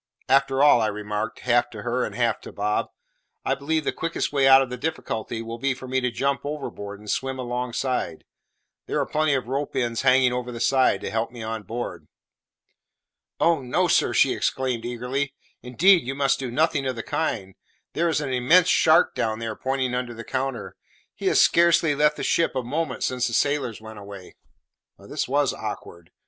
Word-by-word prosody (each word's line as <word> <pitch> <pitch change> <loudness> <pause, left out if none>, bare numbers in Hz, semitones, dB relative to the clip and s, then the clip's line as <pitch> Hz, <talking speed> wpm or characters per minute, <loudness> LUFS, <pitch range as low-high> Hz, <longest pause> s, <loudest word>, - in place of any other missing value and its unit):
After 135 0 +3
all," 145 -5 +6
I 110 - +2
remarked, 105 +1 -4
half 120 -1 +2
to 105 -3 -9
her 125 +2 -1
and - - -4
half 120 -2 0
to - - -10
Bob, 105 +1 -1 0.6
"I - - +2
believe 155 +3 -1
the - - 0
quickest 165 -2 -3
way 135 -2 +3
out 135 0 +8
of 130 - -8
the - - -3
difficulty 115 -5 -4
will 115 +1 -7
be 135 +1 0
for 130 0 -10
me 130 +1 0
to 125 - 0
jump 135 +2 -1
overboard 120 -9 -6
and 105 - -15
swim 135 +4 -2
alongside; 125 -5 -3 0.6
there - - -1
are - - +1
plenty 155 -1 +1
of 130 -3 -2
ropes 140 +2 -3
ends 120 -3 -1
hanging 130 -1 +4
over 125 0 -3
the 120 - -7
side 130 +2 +2
to - - -4
help 110 +2 -1
me 120 -2 -9
on 110 0 -4
board." 115 +5 -6 1.3
"Oh 165 -3 +3
no, 125 -1 +1
sir!" - - +3
she - - +3
exclaimed 130 -3 -1
eagerly; 125 +4 -3 0.3
"indeed 170 +9 +4
you 135 - -3
must 140 0 +1
do 130 -2 -4
nothing 140 +1 +1
of 130 - -2
the 115 - -5
kind. 95 0 -2 0.4
There 170 +1 +1
is 155 -2 0
an 135 -3 -3
immense 165 +9 +4
shark 160 -2 +4
down 110 -1 -1
there," 115 -1 -4
pointing 130 0 -2
under 125 -1 -3
the 115 - -8
counter; 130 +1 -4 0.4
"he - - -4
has - - +4
scarcely 170 -2 +4
left 150 +1 +2
the - - -4
ship 165 -4 +1
a 130 - -1
moment 145 +2 -3
since 125 -1 0
the 115 - -5
sailors 140 -4 0
went 110 -1 -10
away." 100 -2 -11 0.6
This - - -4
was - - +1
awkward. 85 -1 -7
125 Hz, 195 wpm, -24 LUFS, 115-140 Hz, 1.3 s, out